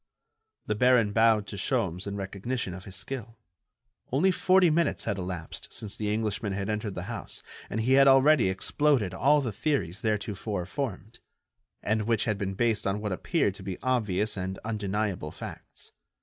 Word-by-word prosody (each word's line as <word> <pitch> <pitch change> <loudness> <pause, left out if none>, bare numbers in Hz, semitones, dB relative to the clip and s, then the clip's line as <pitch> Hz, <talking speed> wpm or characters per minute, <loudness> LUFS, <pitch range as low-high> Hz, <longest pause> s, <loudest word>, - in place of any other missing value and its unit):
The - - 0
baron 120 -2 +4
bowed 110 -2 +4
to 100 - -7
Sholmes 90 0 -1
in 100 - -3
recognition 100 +2 -3
of 95 +1 -9
his 95 - -6
skill. 115 -4 -5 0.7
Only 160 +9 +3
forty 185 -2 +4
minutes 165 -1 +1
had 100 - -1
elapsed 90 -3 -6
since 105 -3 -5
the 105 -1 -2
Englishman 105 -1 -1
had 100 +1 -3
entered 105 -2 -3
the - - -4
house, - - -6 0.3
and 110 - -1
he 125 +4 +2
had 135 0 +7
already 135 -4 +6
exploded 105 +1 +1
all 145 +9 +4
the 120 -5 -2
theories 100 - -1
theretofore 105 -3 -2
formed, 115 -1 -5 0.6
and 110 0 0
which 115 -3 +2
had 105 -3 -1
been 95 -1 -2
based 115 -1 +1
on 100 +1 0
what 105 -1 -3
appeared 95 - 0
to - - -12
be 95 -2 -5
obvious 105 -5 0
and 95 0 -3
undeniable 105 -5 -2
facts. - - -10
105 Hz, 170 wpm, -28 LUFS, 95-125 Hz, 0.7 s, had